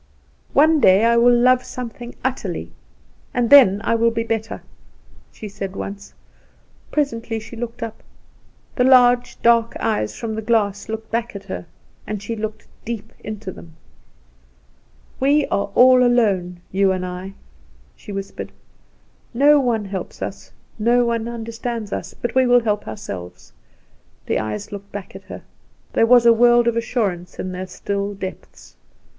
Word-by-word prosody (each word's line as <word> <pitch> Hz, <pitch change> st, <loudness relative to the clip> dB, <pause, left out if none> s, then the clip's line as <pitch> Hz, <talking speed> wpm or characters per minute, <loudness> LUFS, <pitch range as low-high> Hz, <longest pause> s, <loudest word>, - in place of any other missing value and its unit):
"One 310 Hz, +2 st, +5 dB
day 195 Hz, -2 st, +5 dB
I 235 Hz, 0 st, +4 dB
will 240 Hz, +1 st, +6 dB
love 250 Hz, +1 st, +4 dB
something 240 Hz, 0 st, -8 dB
utterly, 260 Hz, 0 st, -3 dB, 0.6 s
and 240 Hz, -2 st, +1 dB
then 205 Hz, -9 st, +8 dB
I -, -, +1 dB
will 230 Hz, 0 st, +3 dB
be 230 Hz, 0 st, -2 dB
better," 225 Hz, -1 st, -3 dB, 0.7 s
she 215 Hz, -, -9 dB
said 195 Hz, -1 st, -6 dB
once. 200 Hz, 0 st, -7 dB, 0.7 s
Presently 230 Hz, -6 st, -2 dB
she 225 Hz, +2 st, -11 dB
looked 235 Hz, +1 st, -6 dB
up. 225 Hz, -1 st, -7 dB, 0.8 s
The 250 Hz, -, +3 dB
large, 245 Hz, -1 st, +4 dB
dark 230 Hz, -1 st, +3 dB
eyes 215 Hz, -, -1 dB
from 225 Hz, -1 st, -4 dB
the 220 Hz, -, -3 dB
glass 210 Hz, -3 st, 0 dB
looked 220 Hz, 0 st, -6 dB
back 230 Hz, 0 st, -2 dB
at 200 Hz, -, -7 dB
her. 185 Hz, -3 st, -7 dB, 0.5 s
She 205 Hz, +3 st, -5 dB
looked 215 Hz, 0 st, -5 dB, 0.2 s
deep 220 Hz, -1 st, -6 dB
into 215 Hz, -2 st, -6 dB
them. 165 Hz, -3 st, -14 dB, 1.4 s
"We 285 Hz, +2 st, +3 dB
are 200 Hz, -, 0 dB
all 255 Hz, 0 st, +7 dB
alone, 195 Hz, -8 st, +1 dB
you 195 Hz, 0 st, +3 dB
and 185 Hz, -1 st, -2 dB
I," 180 Hz, +2 st, -6 dB, 0.6 s
she -, -, -11 dB
whispered; 195 Hz, 0 st, -6 dB, 0.8 s
"no 290 Hz, +3 st, +6 dB
one 235 Hz, -5 st, 0 dB
helps 190 Hz, -2 st, -6 dB
us, 195 Hz, -, -7 dB, 0.3 s
no 240 Hz, +3 st, +3 dB
one 230 Hz, -1 st, -1 dB
understands 230 Hz, -1 st, -5 dB
us; -, -, -5 dB
but 240 Hz, -, -3 dB
we 260 Hz, 0 st, +3 dB
will 245 Hz, 0 st, +5 dB
help 210 Hz, -2 st, -1 dB
ourselves." 90 Hz, -, -8 dB, 0.7 s
The -, -, 0 dB
eyes 105 Hz, -1 st, -5 dB
looked 200 Hz, 0 st, -9 dB
back 200 Hz, -2 st, -8 dB
at 195 Hz, 0 st, -11 dB
her. -, -, -9 dB, 0.5 s
There 225 Hz, -, +3 dB
was 245 Hz, 0 st, +6 dB
a 235 Hz, -, +8 dB
world 240 Hz, +1 st, +4 dB
of 235 Hz, -, +2 dB
assurance 205 Hz, -7 st, -2 dB
in 185 Hz, -, -4 dB
their 185 Hz, +1 st, -5 dB
still 200 Hz, +2 st, -3 dB
depths. 190 Hz, -1 st, -9 dB
225 Hz, 150 wpm, -21 LUFS, 200-240 Hz, 1.4 s, then